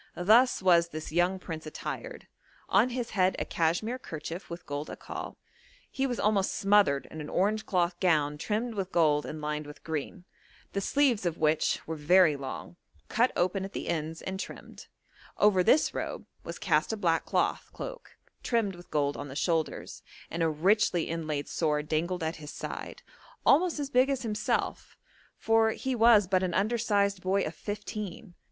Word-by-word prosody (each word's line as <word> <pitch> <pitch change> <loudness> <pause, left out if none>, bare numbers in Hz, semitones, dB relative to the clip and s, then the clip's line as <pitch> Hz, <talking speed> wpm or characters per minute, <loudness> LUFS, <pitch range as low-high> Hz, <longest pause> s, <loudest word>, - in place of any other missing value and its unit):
Thus 220 +5 +4
was 170 -2 +5
this 155 -2 -7
young 175 +3 +2
prince 160 -4 -7
attired: - - -6 0.4
on 250 - +4
his 245 -1 -4
head 185 -2 +2
a - - -2
cashmere 175 +10 0
kerchief 165 -2 -7
with 170 +1 -8
gold 145 +1 -4
akkal; - - -7 0.6
he 270 0 0
was 245 -2 -3
almost 205 -2 +1
smothered 195 -9 +3
in 160 - -6
an 150 - -7
orange 215 +3 0
cloth 175 -1 0
gown 150 -5 +2
trimmed 225 +6 -2
with 195 -3 -3
gold 150 -3 +3
and 155 - -6
lined 150 0 -3
with 150 - -12
green, 160 +3 -5 0.5
the 200 - -1
sleeves 265 -2 +2
of 170 -2 -1
which 155 0 +1
were 160 - -4
very 160 +1 +5
long, 140 +5 -7 0.3
cut 240 +3 +3
open 185 +2 +1
at 195 - -7
the - - -4
ends 160 -1 -3
and 190 0 -4
trimmed; - - -9 0.5
over 205 -3 +4
this 295 - +4
robe - - -4 0.2
was - - -6
cast - - +1
a 220 - -2
black 165 -5 +1
cloth - - 0
cloak - - -8 0.2
trimmed 225 -5 0
with 175 0 -14
gold 145 -1 0
on 145 - -6
the 135 - -9
shoulders, 160 +1 -1 0.3
and 165 - -3
a 165 - +3
richly 175 +2 +2
inlaid 155 -3 -3
sword 150 -2 0
dangled 170 +3 -1
at 160 +2 -2
his 150 -1 -9
side, - - -7 0.4
almost 335 +4 +4
as 285 -2 -4
big 255 +1 +4
as 270 -2 -1
himself, 215 -2 -2 0.4
for 225 0 +3
he 265 +2 -3
was 230 -3 +6
but 185 0 +2
an 185 -2 -1
undersized 205 -3 +1
boy 190 +2 +1
of 155 - -3
fifteen. 205 -1 -6
185 Hz, 175 wpm, -29 LUFS, 160-215 Hz, 0.6 s, was